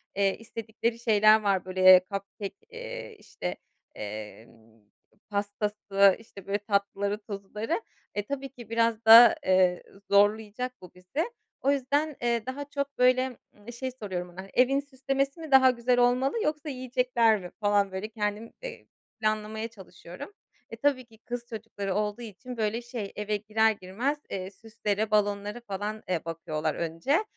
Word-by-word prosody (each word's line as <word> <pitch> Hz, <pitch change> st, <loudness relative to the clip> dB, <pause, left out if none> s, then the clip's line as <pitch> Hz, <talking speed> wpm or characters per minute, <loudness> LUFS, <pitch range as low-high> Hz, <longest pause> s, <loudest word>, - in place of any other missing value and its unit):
eee, 195 Hz, -1 st, +2 dB
istedikleri 225 Hz, +1 st, -4 dB
şeyler 215 Hz, -1 st, +5 dB
var. 195 Hz, -3 st, +1 dB
Böyle, 185 Hz, 0 st, +7 dB
cupcake 195 Hz, 0 st, -5 dB
eee, -, -, -7 dB
işte, -, -, -6 dB, 0.4 s
emm, 110 Hz, +1 st, -9 dB, 0.5 s
pastası, 205 Hz, -1 st, +2 dB
işte, 200 Hz, -4 st, -14 dB
böyle, 200 Hz, +1 st, +1 dB
tatlıları, 200 Hz, 0 st, -1 dB
tuzluları. 210 Hz, -, -4 dB, 0.3 s
Eee, 205 Hz, -, -1 dB
tabii 275 Hz, +2 st, -4 dB
ki, 240 Hz, -3 st, -13 dB
biraz 230 Hz, 0 st, +1 dB
da, 230 Hz, +1 st, +10 dB
eee, 185 Hz, -1 st, +3 dB, 0.3 s
zorlayacak 215 Hz, +4 st, +2 dB
bu 180 Hz, -, -12 dB
bizi. 185 Hz, -, -3 dB, 0.3 s
O 275 Hz, -, +3 dB
yüzden, 285 Hz, +2 st, 0 dB
eee, 235 Hz, -2 st, 0 dB
daha 265 Hz, +3 st, -4 dB
çok, 280 Hz, 0 st, -3 dB
böyle, 255 Hz, 0 st, +3 dB, 0.4 s
şey 260 Hz, -1 st, -2 dB
soruyorum 190 Hz, -8 st, -5 dB
ona, 175 Hz, +2 st, -8 dB
hani, 195 Hz, -, -12 dB
"Evin 260 Hz, +2 st, +4 dB
süslemesi 275 Hz, +1 st, -2 dB
mi 320 Hz, -3 st, -8 dB
daha 260 Hz, -1 st, +8 dB
güzel 245 Hz, 0 st, +1 dB
olmalı 255 Hz, -, +2 dB
yoksa 300 Hz, 0 st, -2 dB
yiyecekler 250 Hz, -4 st, +2 dB
mi?" 180 Hz, -, -8 dB
falan 205 Hz, -2 st, +2 dB
böyle 190 Hz, +3 st, -4 dB
kendim, 215 Hz, 0 st, -3 dB
eee, -, -, -8 dB, 0.3 s
planlamaya 215 Hz, +1 st, -1 dB
çalışıyorum. 195 Hz, -, -11 dB, 0.4 s
E, -, -, -7 dB
tabii 280 Hz, -3 st, +1 dB
ki 225 Hz, -1 st, -20 dB
kız 240 Hz, +2 st, -6 dB
çocukları 210 Hz, -4 st, -4 dB
olduğu 210 Hz, +2 st, -1 dB
için 240 Hz, +3 st, -8 dB
böyle, 220 Hz, +1 st, 0 dB
şey, 235 Hz, -4 st, -6 dB
eve 210 Hz, 0 st, -1 dB
girer 220 Hz, +2 st, +2 dB
girmez, 215 Hz, +9 st, -2 dB
eee, 190 Hz, 0 st, -4 dB
süslere, 215 Hz, -1 st, -3 dB
balonlara 205 Hz, +1 st, 0 dB
falan, 205 Hz, +2 st, -4 dB
eee, 175 Hz, -3 st, -1 dB
bakıyorlar 160 Hz, -2 st, -3 dB
önce. 170 Hz, -, 0 dB
215 Hz, 145 wpm, -28 LUFS, 200-250 Hz, 0.5 s, da